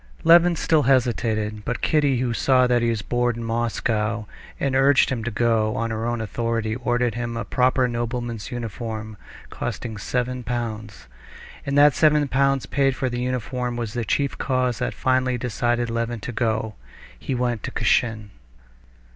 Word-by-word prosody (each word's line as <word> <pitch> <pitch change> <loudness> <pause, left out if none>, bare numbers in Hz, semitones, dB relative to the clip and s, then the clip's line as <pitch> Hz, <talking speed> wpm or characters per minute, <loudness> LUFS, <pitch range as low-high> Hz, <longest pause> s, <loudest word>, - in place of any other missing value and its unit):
Levin 170 +1 +6
still 160 -1 +2
hesitated, 115 -5 +1
but 125 +1 -3
Kitty, 145 -4 +2
who 120 -2 0
saw 130 +1 +3
that 125 -1 +2
he 120 - +1
was 110 -2 -2
bored 120 -1 0
in 120 - -5
Moscow, 115 -1 -1 0.3
and 135 -2 0
urged 135 0 +4
him 120 -3 -2
to 120 - -2
go, 110 -1 +1
on 115 0 -2
her 110 +1 -2
own 120 -1 -2
authority 115 0 -2
ordered 120 -1 0
him 120 -1 -4
the 115 - -3
proper 130 0 +2
nobleman's 120 -1 -4
uniform, 110 -2 -5 0.4
costing 110 -3 -5
seven 125 +4 -2
pounds. 110 - -5 0.6
And 140 +1 0
that 145 0 +7
seven 150 -1 +3
pounds 135 0 +2
paid 135 -2 +1
for 130 -1 -2
the 120 0 -3
uniform 125 0 -2
was 115 -3 -4
the 120 - -2
chief 140 +5 0
cause 130 -3 0
that - - -2
finally 130 -1 +1
decided 120 0 -1
Levin 115 -1 -2
to 120 - -5
go. 110 -2 -1 0.5
He 135 - -3
went 120 -3 -1
to - - -5
Kashin.... 110 -4 0
120 Hz, 165 wpm, -23 LUFS, 115-130 Hz, 0.6 s, that